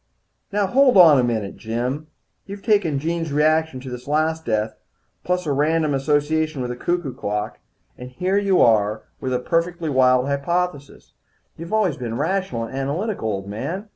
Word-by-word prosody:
"Now 205 0 +1
hold 255 +3 +4
on 160 -6 +8
a - - +3
minute, 110 -5 -2
Jim. 125 +7 -3 0.4
You've 200 0 -8
taken 200 -9 +2
Jean's 165 +2 -2
reaction 155 -1 +2
to 130 - -8
this 125 +1 -8
last 160 +2 0
death, 110 -1 -1 0.5
plus 180 0 -1
a 150 - -1
random 155 +2 +1
association 150 +1 0
with 125 - -3
a - - -4
cuckoo 170 0 -2
clock, 105 -4 -4 0.4
and 125 0 -8
here 185 +10 0
you 195 -2 +2
are 110 -1 +2 0.2
with 130 - -3
a 125 - +1
perfectly 165 +4 -1
wild 130 -1 +4
hypothesis. 145 +1 -3 0.4
You've 165 +2 -9
always 210 -9 +1
been 120 -2 -4
rational 160 -6 -1
and 115 - -7
analytical, 145 - -2
old 100 -1 -4
man. 180 - -5
150 Hz, 170 wpm, -22 LUFS, 125-175 Hz, 0.5 s, on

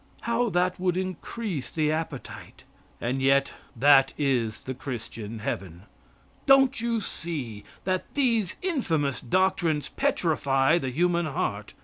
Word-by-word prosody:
How 235 0 +1
that 180 -1 +1
would 180 -1 +1
increase 185 - -4
the 155 -1 0
appetite! 155 -4 -5 0.4
And 130 +3 -1
yet 135 +1 +3 0.2
that 135 +2 +5
is 120 -7 0
the 130 - -4
Christian 115 -4 -6
heaven. 95 -4 -5 0.6
Don't 270 -2 +5
you 235 -1 0
see 140 - -5 0.2
that 185 0 -2
these 230 -9 +2
infamous 160 - 0
doctrines 165 -2 +1
petrify 160 - +2
the 130 - -3
human 170 +4 +1
heart? 105 -7 -3
155 Hz, 120 wpm, -26 LUFS, 130-185 Hz, 0.6 s, that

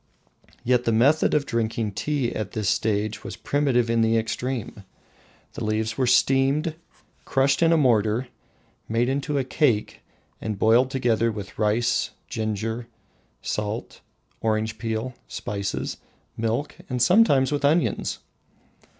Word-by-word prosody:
Yet 125 0 +2
the 115 - +2
method 135 +10 +3
of 145 -1 +2
drinking 115 -2 -1
tea 135 +4 -1
at 105 -3 -4
this 105 -3 -2
stage 105 0 0
was - - -6
primitive 135 -5 +1
in 115 0 +2
the 115 0 +3
extreme. 115 -1 -3 0.7
The - - -5
leaves 110 +1 -1
were 130 0 +1
steamed, 135 +5 +3 0.5
crushed 135 +2 +2
in 165 0 +5
a 165 - +5
mortar, 120 -3 +2 0.6
made 115 +3 +1
into 140 +2 -1
a 135 - +1
cake, 125 -4 0 0.4
and 110 -2 -3
boiled 115 +5 +4
together 115 -4 +1
with 100 -3 -8
rice, 115 +1 +1 0.2
ginger, 110 +1 -3 0.6
salt, 105 +2 -4 0.4
orange 110 0 -1
peel, 115 +2 -3
spices, 100 -1 -4 0.4
milk, 115 +6 -2
and 125 -1 -2
sometimes 140 - +4
with 145 -1 -1
onions! 155 +4 +1
115 Hz, 130 wpm, -24 LUFS, 110-135 Hz, 0.7 s, in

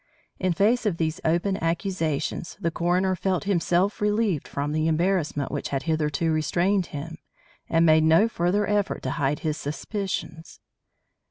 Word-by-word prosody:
In 185 -1 +1
face 220 +6 +2
of 180 -5 0
these 160 -1 -2
open 175 +3 0
accusations, 165 -2 -2
the 170 - -1
coroner 180 +3 +1
felt 185 +1 -1
himself 190 0 +1
relieved 210 -5 +1
from 145 +1 -3
the 155 +1 0
embarrassment 165 -3 0
which - - -3
had 135 -1 -2
hitherto 160 +1 0
restrained 175 +5 +1
him, 160 +3 -7 0.5
and 165 0 +3
made 155 -1 +5
no 160 +7 +5
further 200 0 0
effort 205 -1 0
to 130 - -2
hide 140 +1 -1
his 155 -1 -1
suspicions. 160 +2 -5
170 Hz, 150 wpm, -25 LUFS, 155-195 Hz, 0.5 s, made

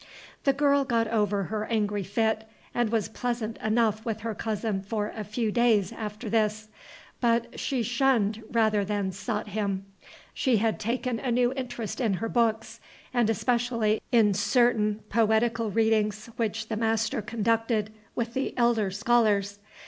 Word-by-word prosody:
The 275 - +4
girl 280 0 +3
got 230 -4 +1
over 210 -3 +1
her 215 +2 -3
angry 210 -3 0
fit, 220 +3 0 0.3
and 240 -2 +1
was 225 -3 +1
pleasant 235 -1 -3
enough 220 -1 +1
with 220 -2 -3
her 225 0 -3
cousin 215 -2 -2
for 210 +1 -3
a 215 - -4
few 215 +1 -2
days 220 -5 +3
after 215 +1 -6
this; 215 0 0 0.5
but 235 -1 +1
she 260 -4 -1
shunned 235 -3 +1
rather 220 -3 +2
than 200 -1 -1
sought 210 +3 -4
him. 200 -2 -2 0.5
She 255 -5 +2
had 220 +1 0
taken 240 +1 -1
a 260 - -3
new 245 +1 +2
interest 245 -3 -4
in 220 -6 +1
her 225 +4 -3
books, 225 -1 0 0.3
and 240 -3 +2
especially 230 -1 +1
in 220 -4 +5
certain 215 0 +2
poetical 225 +1 +2
readings 220 0 +1
which 220 -1 -2
the 220 - -2
master 225 +2 0
conducted 220 0 0 0.2
with 235 0 -2
the 265 +2 -2
elder 235 -4 +2
scholars. 205 -2 +2
220 Hz, 150 wpm, -27 LUFS, 210-235 Hz, 0.5 s, in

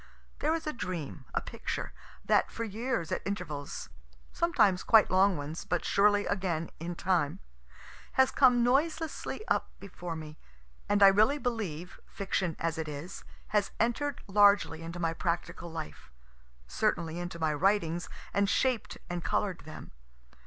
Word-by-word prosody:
There 310 +2 +1
is 325 - -4
a 305 - -2
dream, 165 - -5
a - - +1
picture, - - -5 0.3
that - - +3
for 230 - -4
years 225 -4 -2
at - - -1
intervals, 165 -8 -5 0.4
(sometimes 205 - +3
quite 220 -2 +5
long 190 0 +4
ones, 145 +3 -5
but 175 - -2
surely 205 0 +4
again, 180 -5 -1
in 170 +2 -4
time,) 175 -5 0 0.7
has 265 0 +4
come 245 -3 +5
noiselessly 315 - 0
up - - +1
before 180 -3 -7
me, 155 -1 -9 0.5
and 205 0 +4
I - - +11
really 215 +9 +5
believe, 205 - -4
fiction 190 -4 -2
as 165 0 -1
it 160 - -3
is, 150 +4 -7 0.3
has 205 -1 +1
enter'd 240 +6 0
largely 200 -5 +4
into 165 +1 -6
my 165 -2 0
practical 170 0 -3
life 155 - -7 0.6
certainly 165 - -1
into 175 0 -5
my 160 -2 +1
writings, 175 0 +1 0.2
and 200 0 +2
shaped 255 -2 0
and 175 -1 -4
color'd 190 -7 -1
them. 155 - -10
185 Hz, 145 wpm, -30 LUFS, 165-215 Hz, 0.7 s, I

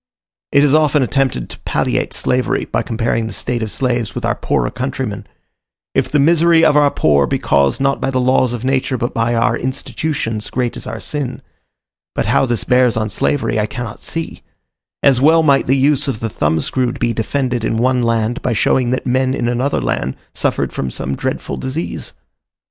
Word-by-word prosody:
It 140 - +5
is 145 -1 +3
often 150 -2 +3
attempted 130 - 0
to - - -9
palliate - - -1
slavery 125 0 0
by - - -1
comparing 115 -1 -1
the 110 - -6
state 120 +4 -2
of 110 - -2
slaves 120 -2 -1
with - - -3
our - - +2
poorer - - -1
countrymen: - - -4 0.7
if - - +1
the 150 - +1
misery 165 +2 +4
of 145 - +4
our 145 -1 +5
poor 70 - +2
be - - 0
caused 70 -1 +2
not 135 0 +1
by - - 0
the 130 -1 0
laws 130 -1 +2
of 120 0 -5
nature, 130 -1 0
but 120 +1 -2
by 115 +1 0
our 115 - +2
institutions, 130 -3 -3
great 125 -2 -2
is - - -8
our 115 - -5
sin; 140 -2 -4 0.7
but - - 0
how 135 - +2
this 120 -3 0
bears 125 -2 +3
on 110 -1 -1
slavery, 115 +2 0
I 105 - 0
cannot 120 -5 -6
see; 165 0 -4 0.6
as 130 -3 +4
well 160 +3 +5
might 140 -3 +3
the 135 +2 +3
use 140 +1 +2
of 125 -6 -2
the 115 - -3
thumb 80 -4 0
screw 125 - 0
be 120 -1 -1
defended 125 +1 -1
in 115 - 0
one 125 +2 +2
land, 115 0 0
by 125 - 0
showing 120 +3 +2
that 130 - -1
men 130 +1 +1
in 120 - -1
another 125 +4 0
land 65 - -2 0.2
suffered - - -1
from 65 - -3
some 65 +2 -4
dreadful - - -3
disease. 135 +6 -5
125 Hz, 195 wpm, -17 LUFS, 115-135 Hz, 0.7 s, It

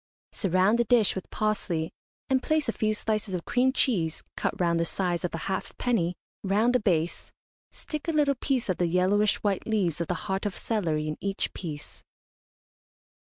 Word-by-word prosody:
Surround 195 +3 +2
the - - +5
dish 230 -3 +4
with 190 - -6
parsley, 190 -7 -1 0.4
and 260 -1 +2
place 310 0 +1
a - - +2
few 215 0 +1
slices 215 -2 -1
of 175 - -4
cream 255 +1 +3
cheese, 185 - +1
cut - - -2
round 170 -2 +2
the - - +3
size 175 0 -1
of 180 - -1
a 165 - -5
halfpenny, 190 -2 -1 0.3
round 210 +5 +2
the 250 - +4
base, 175 -6 0 0.4
stick 305 +1 -6
a - - +2
little 295 -3 +3
piece 260 -1 -1
of 185 - 0
the 175 - +2
yellowish 190 +4 +3
white 200 -3 0
leaves 185 -8 +1
of 170 - -2
the 180 - -1
heart 195 0 -1
of 200 - -5
celery 160 -9 -1
in 155 - -3
each 195 0 -2
piece. 150 -5 -7
195 Hz, 180 wpm, -27 LUFS, 175-230 Hz, 0.4 s, the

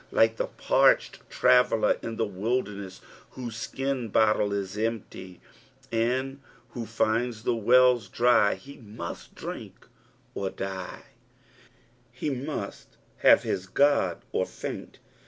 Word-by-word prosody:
Like 115 0 +3
the - - -1
parched - - +2
traveller 125 -3 +4
in 115 - -5
the 115 - 0
wilderuess, 100 -2 -3 0.3
whose 120 -3 -6
slun 130 0 -3
bottle 105 -1 +3
is 100 -1 -3
empty, 105 -4 -4 0.5
and 130 +4 -1 0.3
wlio 115 -2 -5
llndB 115 +1 0
the 120 - +1
wells 120 -1 +4
dry, 120 -3 +4
he 140 +1 -13
must 105 -7 -8
dnnk - - -7 0.6
or 95 -1 -2
die— 95 -1 -6 1.1
he 125 +4 -3
must 130 -5 -6 0.3
bava - - +7
his 95 +1 -3
God 135 -7 +2
or - - 0
faiat. - - -7
115 Hz, 120 wpm, -27 LUFS, 100-125 Hz, 1.1 s, bava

